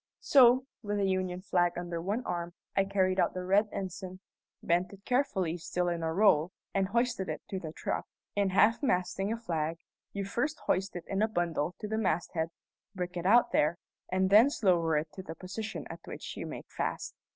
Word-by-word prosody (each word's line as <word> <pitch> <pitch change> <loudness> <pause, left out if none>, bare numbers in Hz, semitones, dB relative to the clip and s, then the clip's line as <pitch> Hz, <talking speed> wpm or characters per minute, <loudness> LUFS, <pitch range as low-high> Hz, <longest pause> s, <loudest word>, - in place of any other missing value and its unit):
So, 255 -1 +6 0.2
with 205 -1 -2
the 200 - +2
Union 185 -1 -1
flag 175 -3 +2
under 175 -1 -3
one 205 +8 -2
arm, 175 0 -3 0.2
I 195 - +3
carried 190 -1 +1
out - - +2
the 185 - -3
red 200 +3 +3
ensign, 185 -1 -5 0.4
bent 175 +2 +1
it 200 -1 -14
carefully, 195 - +1
still 180 +2 -1
in 170 -1 -2
a 160 0 -1
roll, 180 -3 +4 0.2
and 195 -1 +2
hoisted 235 -3 0
it - - -4
to 190 - -2
the 160 -3 -6
truck. - - -3 0.3
In 200 -1 +2
half 210 +5 +4
masting 195 -4 0
a 230 - -1
flag, 165 -7 -2 0.3
you 200 -1 -3
first 270 +10 -1
hoist 190 +1 0
it 175 - -5
in 195 +1 -1
a 220 - +4
bundle 175 -5 -1
to 210 - -4
the 220 +1 -1
masthead, 165 -4 0 0.5
break 180 -1 -4
it 175 +1 -1
out 235 +4 +5
there, 155 +3 +2 0.3
and 190 +1 +2
thence 230 +6 +6
lower 170 -5 +3
it 155 +1 -2
to 190 - -7
the 165 -3 -8
position 200 +6 -5
at - - -8
which - - -7
you - - -5
make - - -7
fast. - - -3
185 Hz, 200 wpm, -31 LUFS, 175-205 Hz, 0.5 s, So